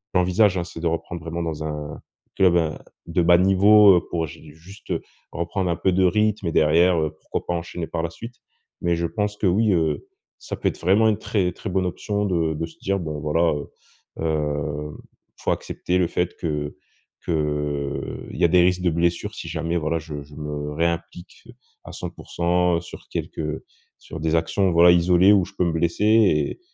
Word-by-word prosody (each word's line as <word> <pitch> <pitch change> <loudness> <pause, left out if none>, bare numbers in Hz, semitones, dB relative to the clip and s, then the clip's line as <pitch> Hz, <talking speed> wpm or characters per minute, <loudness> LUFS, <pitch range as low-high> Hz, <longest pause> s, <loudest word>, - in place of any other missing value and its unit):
j'envisage 95 +2 +3
hein, 90 - -1
c'est 85 -2 -9
de 85 - 0
reprendre 85 +1 -3
vraiment 85 +1 -4
dans 80 -2 -4
un, 75 -1 -5 0.4
club 90 -2 +5
à 80 -2 -1 0.2
de 85 +1 +1
bas 85 +1 +6
niveau, 100 +2 +6
heu, 85 - -2
pour 80 -1 -1
j’ai 80 0 -13
juste 90 +6 -13 0.4
reprendre 90 +2 -2
un 85 - +1
peu 95 - +1
de 95 +1 +3
rythme 105 +1 +1
et - - 0
derrière, 85 +4 +4 0.2
pourquoi - - -4
pas - - 0
enchaîner 85 0 -5
par 80 -1 -3
la 85 - -1
suite? 115 +7 -10 0.5
Mais 85 0 +1
je 85 0 -1
pense 105 +2 -2
que 100 - +1
oui, 105 +4 +3
heu, 80 -4 0 0.3
ça - - -6
peut - - -1
être - - -9
vraiment 100 +6 +4
une 105 - +1
très 100 -4 -1
très 105 - -6
bonne 95 0 0
option 105 +3 -2
de 85 -4 0
de 80 +2 -2
se 80 - -17
dire, 100 0 -1
bon 75 -4 -4
voilà, 80 +2 +2
heu 75 - -6 0.5
heu, 75 -1 -2 0.3
il - - -23
faut - - 0
accepter 90 - -2
le 90 -2 +2
fait 90 +1 -2
que 75 -3 -3 0.5
qu'il 75 -3 -3
y - - +1
a - - +6
des 90 +1 +5
risques 90 0 +1
de 90 - +3
blessures 85 +1 0
si - - -7
jamais 85 +1 -2
voilà, 80 0 -1
je 75 -2 -7
je 70 0 -16
me 75 0 -5
réimplique, 85 +5 -3 0.4
à - - -9
100% 90 0 -1
sur 85 - -12
quelques 75 -1 -4 0.4
sur 80 - -9
des 80 +1 0
actions, 85 +4 +1
voilà 85 +1 +7
isolées, 90 +2 +5
où 95 -3 +3
je 100 - -14
peux - - +2
me 85 - +1
blesser 85 +4 0
et 110 - +3
85 Hz, 195 wpm, -23 LUFS, 80-90 Hz, 0.5 s, voilà